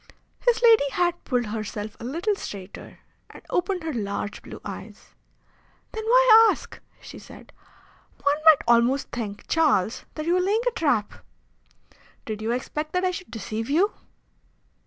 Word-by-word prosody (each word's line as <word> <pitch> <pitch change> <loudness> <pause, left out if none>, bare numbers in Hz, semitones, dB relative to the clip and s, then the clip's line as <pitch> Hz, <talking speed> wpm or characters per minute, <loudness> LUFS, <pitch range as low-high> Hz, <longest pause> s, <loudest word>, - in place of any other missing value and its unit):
His 485 -1 +1
lady 450 -12 +6
had 350 -1 0
pulled 245 -3 0
herself 210 0 -5
a - - -10
little 335 - -1
straighter 200 - -9 0.3
and - - -14
opened 360 0 -1
her 320 -1 -3
large 205 -2 -4
blue - - -10
eyes. - - -9 0.8
"Then 440 - -5
why 455 -1 +7
ask?" - - -4 0.2
she - - -11
said. - - -14 0.7
"One 285 +1 +2
might 315 -3 +7
almost 240 +3 +3
think, 210 -4 -6
Charles, 270 - +1
that 310 - -5
you 340 - +2
were 365 - +3
laying 415 +5 +1
a - - +3
trap! 285 - -1 1.0
Did 215 -1 -5
you 220 - -3
expect 300 +5 -4
that 365 +1 +1
I 365 - +2
should 365 0 -8
deceive 225 +1 -5
you? 360 +9 +3
295 Hz, 155 wpm, -24 LUFS, 225-365 Hz, 1.0 s, why